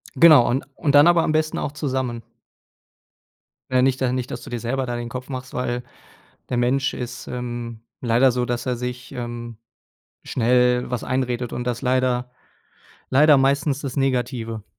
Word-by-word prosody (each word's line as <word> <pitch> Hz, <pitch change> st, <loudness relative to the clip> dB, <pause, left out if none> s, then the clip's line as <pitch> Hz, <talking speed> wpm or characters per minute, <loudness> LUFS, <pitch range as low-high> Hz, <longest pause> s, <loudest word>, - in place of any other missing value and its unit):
Genau 155 Hz, -7 st, +7 dB
und 130 Hz, +3 st, 0 dB
und 145 Hz, -, 0 dB
dann 145 Hz, +3 st, +7 dB
aber 170 Hz, -1 st, +5 dB
am -, -, 0 dB
besten 155 Hz, 0 st, 0 dB
auch 140 Hz, -, -2 dB
zusammen. 130 Hz, -5 st, -3 dB, 1.5 s
Ne, 130 Hz, -1 st, +3 dB
nicht 130 Hz, 0 st, +1 dB
da 125 Hz, -1 st, +1 dB
nicht 130 Hz, -1 st, -2 dB
dass -, -, -5 dB
du -, -, -10 dB
dir 120 Hz, -, -4 dB
selber 130 Hz, +3 st, -2 dB
da 120 Hz, -1 st, -3 dB
den 120 Hz, 0 st, -5 dB
Kopf 125 Hz, +2 st, -7 dB
machst, 130 Hz, -1 st, -6 dB
weil 125 Hz, -1 st, -2 dB, 0.7 s
der 125 Hz, -, -1 dB
Mensch 130 Hz, +3 st, +1 dB
ist, 125 Hz, 0 st, -6 dB
ähm, 120 Hz, -2 st, -5 dB, 0.2 s
leider 125 Hz, +2 st, +4 dB
so, 125 Hz, 0 st, -1 dB
dass 120 Hz, 0 st, -3 dB
er 125 Hz, -1 st, 0 dB
sich, 125 Hz, +1 st, -6 dB
ähm, 120 Hz, -1 st, -6 dB, 0.7 s
schnell 125 Hz, +1 st, +2 dB
was 125 Hz, -, -2 dB
einredet 125 Hz, -2 st, -2 dB
und 120 Hz, -, -3 dB
das 125 Hz, -1 st, -2 dB
leider 125 Hz, -1 st, +1 dB, 0.8 s
leider 145 Hz, +2 st, +6 dB
meistens 140 Hz, +1 st, +1 dB
das 135 Hz, -4 st, -5 dB
Negative. 125 Hz, -5 st, -1 dB
125 Hz, 170 wpm, -22 LUFS, 120-135 Hz, 1.5 s, Genau